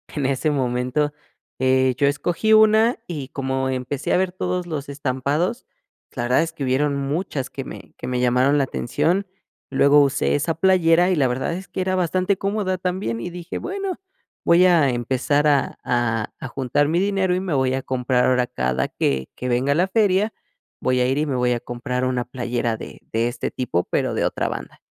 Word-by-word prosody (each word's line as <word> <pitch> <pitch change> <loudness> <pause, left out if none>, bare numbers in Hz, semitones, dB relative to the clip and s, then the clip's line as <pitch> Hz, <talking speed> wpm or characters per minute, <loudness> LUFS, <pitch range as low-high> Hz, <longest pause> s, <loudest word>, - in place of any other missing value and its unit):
en 140 -3 -1
ese 140 +3 0
momento, 130 +2 0 0.5
eh, 130 -1 +3
yo 145 - +2
escogí 175 +9 +1
1, 220 +2 +5
y 145 -6 -5
como 130 -1 -2
empecé 130 +2 -2
a - - +4
ver 185 -1 +1
todos 180 -1 -3
los 145 -3 -5
estampados, 145 - -1 0.5
la 120 - -3
verdad 125 +6 +3
es 165 0 -5
que 145 - -5
hubieron 140 +3 +1
muchas 140 -1 -2
que 135 - -6
me - - -10
que - - -7
me 125 -1 -1
llamaron 125 +4 +3
la 135 - +2
atención. 180 +11 -1 0.4
Luego 140 +2 +5
usé 140 0 +1
esa 155 +3 0
playera, 175 -1 +4
y - - +2
la 135 -4 +3
verdad 130 +6 -2
es 190 +3 -6
que 185 - -3
era 185 0 0
bastante 185 +2 +1
cómoda 195 -2 -1
también, 180 - -2
y 175 - -5
dije: 175 0 -6
"Bueno, 390 0 -4 0.5
voy 175 +2 +6
a 165 -6 +5
empezar 130 +5 +1
a 145 -2 +2
a 115 -3 -1
a - - -5
juntar 135 +3 0
mi 170 +2 +2
dinero, 195 -2 +1
y - - 0
me 185 -5 -2
voy 130 -1 +1
a 135 - -1
comprar 125 -1 +1
ahora 125 -1 +2
cada 65 +1 -1
que 65 -1 -1
que 125 - -4
venga 130 +4 +1
la 180 +3 +2
feria, 205 0 +2 0.5
voy 130 0 +1
a 125 - +2
ir 135 +2 0
y 155 - +1
me 140 -3 -2
voy 125 0 +1
a 120 - -2
comprar 125 +2 -3
una 125 -1 0
playera 120 -2 -2
de 65 -4 -10
de 115 +1 +1
este 120 - -4
tipo, 90 -9 -1
pero - - -1
de - - 0
otra - - -1
banda". - - -6
140 Hz, 200 wpm, -22 LUFS, 125-180 Hz, 0.5 s, voy